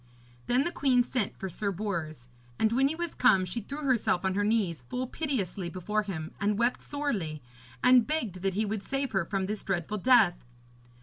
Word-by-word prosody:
Then 250 Hz, +3 st, +3 dB
the 345 Hz, -, -1 dB
queen 255 Hz, -6 st, +3 dB
sent 240 Hz, -4 st, -2 dB
for 190 Hz, -, -4 dB
Sir 200 Hz, +3 st, -2 dB
Bors, 165 Hz, -, -4 dB, 0.3 s
and 220 Hz, -, +2 dB
when 265 Hz, +3 st, +3 dB
he 305 Hz, -, -2 dB
was 340 Hz, -1 st, -3 dB
come 195 Hz, -7 st, +4 dB
she 210 Hz, +6 st, -4 dB
threw 280 Hz, +8 st, -7 dB
herself 235 Hz, -8 st, +1 dB
on 190 Hz, -, +1 dB
her 205 Hz, +2 st, +1 dB
knees 205 Hz, -, +1 dB
full 255 Hz, +1 st, -2 dB
piteously 210 Hz, -, -2 dB
before 200 Hz, +4 st, -1 dB
him, 175 Hz, -7 st, -5 dB
and 205 Hz, 0 st, +1 dB
wept 240 Hz, +2 st, +1 dB
sorely, 215 Hz, -, -3 dB, 0.4 s
and 250 Hz, -2 st, +6 dB
begged 235 Hz, -, -2 dB
that 195 Hz, -1 st, -1 dB
he 215 Hz, +2 st, +1 dB
would 210 Hz, 0 st, -2 dB
save 275 Hz, +4 st, -2 dB
her 190 Hz, -4 st, 0 dB
from 195 Hz, +1 st, -1 dB
this 210 Hz, +2 st, -4 dB
dreadful 195 Hz, +2 st, -2 dB
death. 220 Hz, -6 st, +4 dB
210 Hz, 195 wpm, -29 LUFS, 185-255 Hz, 0.4 s, and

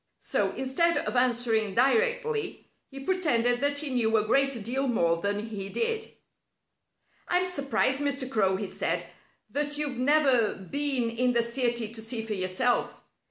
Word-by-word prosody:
So, -, -, 0 dB
instead 305 Hz, +6 st, +1 dB
of -, -, -2 dB
answering 235 Hz, -4 st, +1 dB
directly, 460 Hz, -, +1 dB, 0.2 s
he 275 Hz, 0 st, -9 dB
pretended 250 Hz, -9 st, +1 dB
that 285 Hz, 0 st, +1 dB
he 290 Hz, -1 st, -1 dB
knew 225 Hz, -3 st, +2 dB
a 210 Hz, -, +1 dB
great 270 Hz, 0 st, +1 dB
deal 265 Hz, +5 st, -1 dB
more 170 Hz, -9 st, +1 dB
than 205 Hz, +5 st, -3 dB
he 195 Hz, -3 st, -5 dB
did. 455 Hz, -, -1 dB, 1.2 s
"I'm 360 Hz, +1 st, +2 dB
surprised, 280 Hz, -5 st, 0 dB
Mr. 280 Hz, -2 st, -1 dB
Crow," 200 Hz, -7 st, +1 dB
he 200 Hz, +1 st, -4 dB
said, 185 Hz, -, -2 dB, 0.5 s
"that 290 Hz, +3 st, -2 dB
you've 285 Hz, -4 st, -3 dB
never 265 Hz, -4 st, +3 dB
been 260 Hz, +3 st, +1 dB
in 245 Hz, +2 st, +1 dB
the 235 Hz, -1 st, +3 dB
city 235 Hz, -2 st, -1 dB
to 225 Hz, -, -5 dB
see 225 Hz, 0 st, -2 dB
for 220 Hz, -, -3 dB
yourself. 190 Hz, +6 st, 0 dB
250 Hz, 155 wpm, -27 LUFS, 225-285 Hz, 1.2 s, never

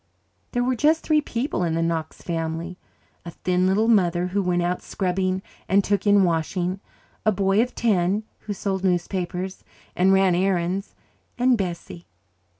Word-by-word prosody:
There 245 Hz, -1 st, +1 dB
were 255 Hz, +1 st, +1 dB
just 310 Hz, +6 st, +2 dB
three 305 Hz, -1 st, +3 dB
people 245 Hz, -5 st, -2 dB
in 165 Hz, -2 st, 0 dB
the 165 Hz, -, +1 dB
Knox 165 Hz, -1 st, -3 dB
family 165 Hz, +1 st, -3 dB, 0.4 s
a 170 Hz, -, -7 dB
thin 180 Hz, +2 st, 0 dB
little 205 Hz, +4 st, +2 dB
mother, 180 Hz, -6 st, +3 dB
who 200 Hz, +2 st, 0 dB
went 180 Hz, -2 st, +1 dB
out 180 Hz, +1 st, -1 dB
scrubbing 185 Hz, 0 st, -1 dB, 0.3 s
and 195 Hz, +1 st, +4 dB
took 205 Hz, +1 st, 0 dB
in 205 Hz, -1 st, +6 dB
washing, 180 Hz, +2 st, -1 dB, 0.4 s
a 215 Hz, -, +3 dB
boy 195 Hz, +1 st, +2 dB
of 250 Hz, +1 st, -2 dB
ten, 200 Hz, -2 st, +1 dB, 0.2 s
who 210 Hz, -, -5 dB
sold 190 Hz, -1 st, -3 dB
newspapers 180 Hz, 0 st, -2 dB, 0.3 s
and 185 Hz, +2 st, +4 dB
ran 190 Hz, -1 st, +4 dB
errands 185 Hz, +1 st, 0 dB, 0.4 s
and 250 Hz, 0 st, +4 dB
Bessie. 175 Hz, -3 st, -5 dB
185 Hz, 155 wpm, -24 LUFS, 175-205 Hz, 0.4 s, in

